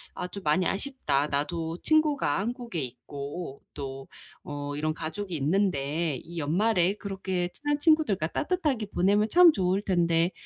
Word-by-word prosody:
'아 180 - -3
좀 200 +2 -8
많이 155 +5 +2
아쉽다. 195 - 0
나도 160 +3 -2
친구가 300 - +2
한국에 235 -3 -3
있고 140 +4 -7
또 135 -1 -6 0.4
어 145 0 -5
이런 155 +1 -1
가족이 170 +4 -4
있는데 155 -2 0
이 170 +5 -10
연말에 180 +4 +2
그렇게 190 -3 -3
친한 290 0 -1
친구들과 300 - +3
따뜻하게 295 - -1
보내면 205 +3 +2
참 355 -1 +8
좋을 190 -1 +1
텐데. 170 -2 +2
180 Hz, 300 characters per minute, -28 LUFS, 150-210 Hz, 0.4 s, 참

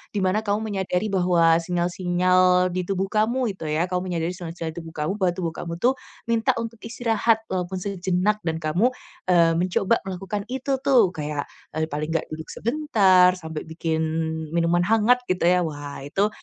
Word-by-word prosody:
di 200 - 0
mana 190 +3 +2
kamu 215 0 -1
menyadari 190 +1 -1
bahwa 175 -3 +4
sinyal-sinyal 180 +1 +2
di 180 0 -3
tubuh 195 0 -1
kamu 230 +2 +1
itu 175 -5 -7
ya, 160 +4 0
kamu 180 +1 -1
menyadari 170 -1 -1
sinyal-sinyal 170 -2 -6
di 160 - -17
tubuh 165 -1 -11
kamu 150 +3 -1
bahwa 185 -2 +2
tubuh 170 -3 -2
kamu 170 0 -6
tuh 255 +2 +3 0.3
minta 225 -1 +2
untuk 230 -1 -5
istirahat 225 -1 0
walaupun 185 0 -2
sejenak 190 +2 0
dan 160 - 0
kamu, 170 +9 +2 0.4
eee, 170 -2 +5
mencoba 185 +5 +1
melakukan 195 +2 -4
itu 265 +3 -2
tuh 245 -8 +5
kayak, 150 -4 -4 0.2
eee, 160 +1 -1
paling 150 +2 -3
gak 165 - -1
duduk 160 0 -6
sebentar 205 -9 +4
sampai 160 -4 -7
bikin 160 0 -2 0.6
minuman 170 +1 +2
hangat 225 +4 +4
gitu 185 -4 -1
ya. 180 -1 +3
Wah 145 -3 -6
itu, 195 +8 +1
180 Hz, 170 wpm, -24 LUFS, 165-210 Hz, 0.6 s, eee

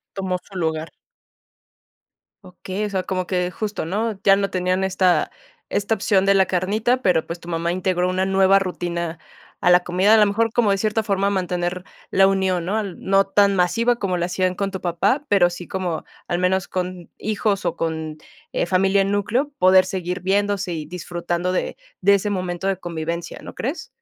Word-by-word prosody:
tomó 190 -2 -2
su 195 - -13
lugar. 160 -1 -2 1.5
Okey, 185 +2 -5
o 210 - -3
sea, 190 -2 -1
como 185 -1 -3
que 180 -1 -1
justo, 205 -3 -4
¿no?, 210 +2 -2
ya 195 0 +6
no 200 0 -1
tenían 185 +1 0
esta 185 -4 +2 0.4
esta 205 +2 0
opción 195 -1 +2
de 195 - +5
la 190 -1 +4
carnita, 210 +8 0
pero, 175 -6 +2
pues, 170 +1 -6
tu 170 - -12
mamá 170 0 -1
integró 180 0 0
una 185 +1 0
nueva 195 0 +4
rutina 170 -2 -3 0.4
a - - +2
la 180 0 +7
comida. 185 +5 +3
A - - +7
lo 215 - +6
mejor, 220 +2 +1
como 230 -3 +2
de 195 - +2
cierta 215 +2 0
forma, 200 -2 0
mantener 180 -2 -2 0.3
la 195 0 +5
unión, 190 -3 0
¿no?, 210 +4 0
no 195 +1 +1
tan 200 0 +3
masiva 230 +7 +2
como 185 -3 -1
lo 175 - -1
hacían 185 0 0
con 195 +1 -2
tu 190 -1 -6
papá, 195 - 0
pero 185 -4 +4
sí 175 0 -8
como, 180 -4 -3 0.2
al 175 - 0
menos 185 +1 +1
con 180 -1 -4
hijos 210 -2 -1
o - - 0
con, 160 -1 -3 0.3
eh, - - 0
familia 195 +1 +3
núcleo, 205 +8 0
poder 185 0 +6
seguir 180 0 -3
viéndose 195 0 0
y 155 -2 -5
disfrutando 175 +1 -3
de 185 - -2 0.2
de 200 - +5
ese 200 +1 0
momento 185 -1 -2
de 195 - +1
convivencia, 170 -1 -5
¿no - - -9
crees? 275 +8 -4
185 Hz, 185 wpm, -22 LUFS, 180-200 Hz, 1.5 s, la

